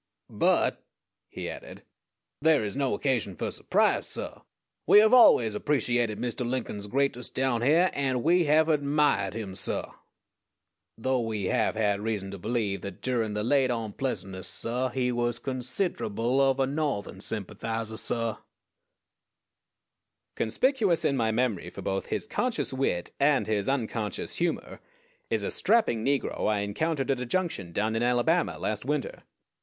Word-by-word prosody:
But," - - +2 0.5
he - - -6
added, - - -9 0.6
"there 160 -4 +4
is 100 - -4
no 135 -5 0
occasion 115 -7 -1
for - - -3
surprise, - - +1
suh. - - -6 0.5
We - - +7
have 215 +3 +6
always 120 - +7
appreciated 120 -2 0
Mr. 125 +1 -3
Lincoln's 120 -4 -3
greatness 130 +1 0
down 130 -3 0
hyear, 165 +8 +4
and 130 -3 0
we 175 +1 +4
have 155 +2 +4
admiahed 145 - +2
him, 105 -4 -5
suh; - - -2 1.1
_though 130 +1 0
we 110 -3 -3
have 95 - +1
had 105 -2 +1
reason 105 -3 -3
to 100 - -7
believe 105 -1 -1
that 100 -3 -8
durin' 115 -4 0
the 105 0 -2
late 130 +2 +3
onpleasantness, 110 -4 -3
suh, 125 +3 -2
he 125 0 0
was 120 -1 -1
consid'rable 125 - -1
of 135 -1 +3
a 135 - +3
No'thern 135 -9 -2
sympathizah, 110 +2 -4
suh_." 115 0 -2 2.0
Conspicuous 205 - +1
in 140 - +2
my 115 -4 +1
memory 110 -4 0
for - - -9
both 95 0 -2
his - - -2
conscious 240 - -1
wit 130 -10 -1
and 140 -1 +3
his 105 0 0
unconscious 115 -6 -2
humor 205 +11 -2 0.5
is - - 0
a - - -2
strapping 210 - +2
negro 140 -3 0
I 105 -1 +1
encountered 135 +7 -1
at 135 - 0
a 125 - -3
junction 145 - -2
down 110 +5 -1
in 115 - 0
Alabama 125 +8 +2
last 105 -1 -2
winter. 145 +1 -3
125 Hz, 150 wpm, -28 LUFS, 110-140 Hz, 2.0 s, We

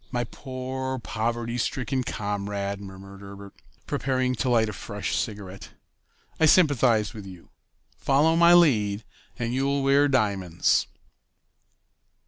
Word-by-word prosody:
"My 120 -1 -1
poor, 130 +1 -5
poverty 115 +1 -3
stricken 130 +1 -1
comrade!" 100 -2 -3
murmured 95 0 -11
Herbert, 100 0 -11 0.3
preparing 130 -1 -1
to 120 +4 -1
light 115 -2 +3
a 105 - -5
fresh 100 +1 -4
cigarette. 100 -4 -5 0.7
"I 160 - +5
sympathize 130 - +3
with 105 -3 -9
you. 90 -3 -13 0.5
Follow 150 +4 +3
my 170 +1 +6
lead, 110 -11 +3 0.3
and 120 0 -3
you'll 140 +1 0
wear 140 +1 +4
diamonds." 100 - +1
115 Hz, 115 wpm, -25 LUFS, 100-130 Hz, 0.7 s, my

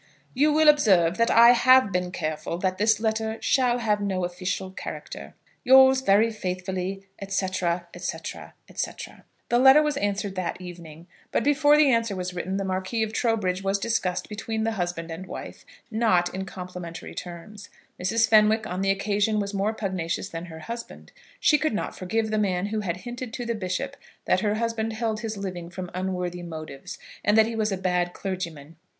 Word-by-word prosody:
You 295 +4 +3
will 310 +1 +4
observe 190 - +5
that 230 0 +3
I 235 +1 +8
have 255 -2 +5
been 180 -1 -1
careful 155 -1 -3
that 185 +1 -1
this 215 0 +3
letter 220 0 -1
shall 250 -3 +2
have 210 -3 0
no 190 -3 -1
official 180 +1 -4
character. - - -8 0.3
Yours 265 0 +7
very 220 0 +4
faithfully, 185 -1 -4 0.3
&c., 195 -1 0
&c., 175 -2 -1 0.9
&c. - - -2 0.6
The 240 - +3
letter 265 +4 +7
was 300 -2 -1
answered 205 -3 -1
that 185 -2 -3
evening, 170 -3 -10 0.3
but - - +1
before 290 +1 +4
the 300 -3 +5
answer 230 -4 +1
was 180 -1 -4
written, 185 +2 -3
the 200 - -1
Marquis 190 +4 -1
of 220 0 -4
Trowbridge 215 -6 0
was 195 +1 +1
discussed 195 -4 -1
between 220 +1 -3
the 225 - 0
husband 175 -4 -3
and 180 +3 -7
wife, - - -9 0.2
not 215 -6 +2
in 190 +1 -4
complimentary 180 -2 -8
terms. 190 +4 -9 0.3
Mrs. 225 +5 +2
Fenwick 215 0 +4
on 185 +1 -3
the 195 - +1
occasion 205 +2 +1
was 200 0 -3
more 200 +2 0
pugnacious 190 -4 -3
than 165 -2 -6
her 160 -2 -10
husband. 235 +6 -8 0.3
She 300 - +4
could 305 -7 0
not - - -3
forgive 220 +4 -2
the 215 - +1
man 190 -2 0
who 215 +1 -2
had 180 -4 -2
hinted 240 -1 -6
to 245 - -4
the 235 - -1
bishop 185 -4 -3 0.3
that - - +3
her 210 +1 0
husband 225 0 -2
held 220 -1 -2
his 220 -1 -4
living 180 -3 -5
from 180 0 -7
unworthy 180 -1 -3
motives, 155 -5 -8 0.3
and 210 +1 +3
that 220 - +7
he 230 +1 -4
was 215 -1 0
a 195 - -1
bad 180 -1 0
clergyman. 165 -5 -6
200 Hz, 180 wpm, -25 LUFS, 180-225 Hz, 0.9 s, I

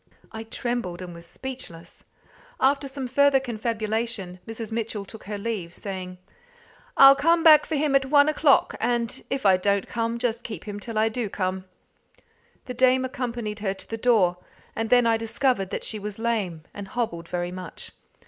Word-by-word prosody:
I 220 0 -7
trembled, 225 -6 -3
and 175 -1 -8
was 170 0 -11
speechless. 245 -9 -9 0.5
After 275 +1 +2
some 265 -1 -5
further 280 +1 +4
confabulation, 220 -5 -3
Mrs. 225 -1 -6
Mitchell 220 -2 -3
took 220 +2 -11
her 205 +1 -4
leave, 200 -5 -4
saying 185 -2 -6 0.8
"I'll 275 0 +10
come 330 +4 +3
back 310 -2 +7
for 320 - -1
him 290 -1 +1
at 270 -1 +3
one 285 +1 +5
o'clock, 305 -2 +3
and 235 0 -1
if 270 -4 -3
I 190 -2 +6
don't 200 +1 0
come, 230 0 -2
just 235 -1 -1
keep 225 - -7
him 205 -1 -6
till 225 +1 -6
I 220 +1 +4
do 225 -1 -3
come." 185 -1 -3 1.0
The 250 - -5
dame 255 +1 +3
accompanied 240 -5 -4
her 195 -2 -2
to - - -9
the 225 - -4
door, 220 -7 +3 0.4
and 225 0 -2
then 245 -1 +5
I 230 -1 +3
discovered 225 -2 0
that - - -4
she 215 - -3
was 205 0 -6
lame, 210 -8 -2
and 200 -1 -7
hobbled 170 -9 -3
very 175 0 -3
much. 180 -1 -8
225 Hz, 175 wpm, -25 LUFS, 200-255 Hz, 1.0 s, I'll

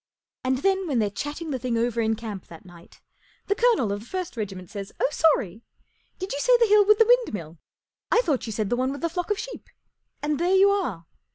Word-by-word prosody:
And 260 0 +1
then, 385 -1 +2
when 275 -5 0
they're 210 -3 +1
chatting 295 +8 -5
the 260 - -2
thing 240 -1 -1
over 235 0 0
in 220 0 +1
camp 210 -4 -7
that 165 +2 -13
night, 175 -1 -16 0.4
the 405 - +1
colonel 445 - +2
of 200 - -2
the 215 - -12
first 365 -1 -4
regiment 190 -5 -6
says, 200 -2 -6
ft - - -35
Oh, - - +2
sorry! 255 - +1 0.6
Did 375 +1 -5
you 280 - -3
say - - +5
the 475 - +4
hill 420 -1 +6
with 420 +1 +5
the 450 - +5
windmill? 210 - +1 0.5
I 470 - +5
thought 280 - -1
you - - -4
said 215 -2 -2
the - - +3
one 255 +2 0
with 280 - -6
the 335 - 0
flock 355 +2 -4
of 415 - +1
sheep/' - - -8 0.5
And 295 -1 0
there 355 +3 +2
you 395 +1 +6
are 250 - -2
270 Hz, 240 wpm, -25 LUFS, -, 0.6 s, hill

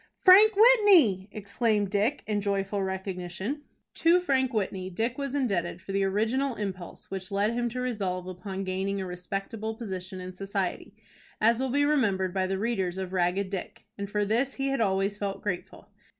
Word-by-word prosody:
"Frank 415 +3 +8
Whitney!" 395 - +6
exclaimed 205 0 0
Dick, 215 +8 +1
in 210 -1 -1
joyful 200 0 -1
recognition. 190 - -4 0.3
To 340 +2 +4
Frank 265 -7 +1
Whitney 190 -4 -2
Dick 230 +8 -2
was 275 -1 -3
indebted 185 -11 -1
for 190 +2 -8
the 195 0 +1
original 225 +7 0
impulse 190 -5 -6
which 190 -1 -5
led 205 +3 +1
him 240 0 -1
to 250 +2 -5
resolve 195 -7 -2
upon 190 +1 -5
gaining 190 +1 -2
a 190 - -3
respectable 195 +5 -5
position 190 -4 -6
in 185 0 -7
society, 195 +1 -3 0.4
as 230 +2 +3
will 265 0 -1
be 285 +3 +2
remembered 200 -11 +1
by 190 -1 0
the 190 0 -1
readers 190 -4 -1
of 190 -1 -5
"Ragged 185 +2 0
Dick;" 190 -3 -6
and 200 -1 -5
for 210 0 0
this 240 +6 0
he 275 0 -1
had 270 -3 0
always 195 0 +1
felt 200 -1 -4
grateful. 185 -4 -5
200 Hz, 175 wpm, -28 LUFS, 190-240 Hz, 0.4 s, Frank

